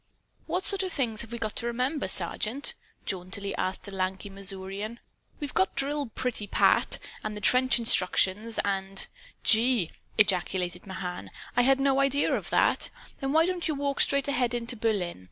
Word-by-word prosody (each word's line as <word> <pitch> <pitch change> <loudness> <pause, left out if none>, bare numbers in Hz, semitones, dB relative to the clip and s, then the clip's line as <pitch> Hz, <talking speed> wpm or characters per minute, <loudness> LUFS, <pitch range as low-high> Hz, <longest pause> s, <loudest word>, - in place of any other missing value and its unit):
"What 370 +2 -1
sort 395 -1 +8
of 375 -1 -3
things 230 -8 -1
have 230 -1 -6
we 235 - -4
got 220 -2 -3
to 235 - +1
remember, 250 +4 -1
Sergeant?" 215 - -1 0.3
jauntily 195 +2 -4
asked 185 +2 -3
a - - -7
lanky 190 +1 -3
Missourian. 195 +3 -3 0.4
"We've 290 -3 -5
got 190 - +2
the - - +2
drill 285 0 0
pretty 230 -2 -3
pat; - - +3 0.3
and 215 -1 -4
the - - -5
trench 255 +4 +4
instructions 215 0 +2
and 195 -1 -1 0.2
" - - -25
"Gee!" 225 -5 +4 0.3
ejaculated 180 -3 +1
Mahan. 185 -2 -6 0.3
"I 245 - +5
had 270 +2 +4
no 270 0 +2
idea 275 +1 +2
of - - -2
that! - - +2 0.3
Then 270 -1 -2
why 320 +2 +4
don't 360 -1 -1
you 310 - -1
walk 280 0 -2
straight 280 0 +2
ahead 245 -3 +1
into 240 +1 -3
Berlin? 210 - -1
230 Hz, 175 wpm, -28 LUFS, 195-270 Hz, 0.4 s, sort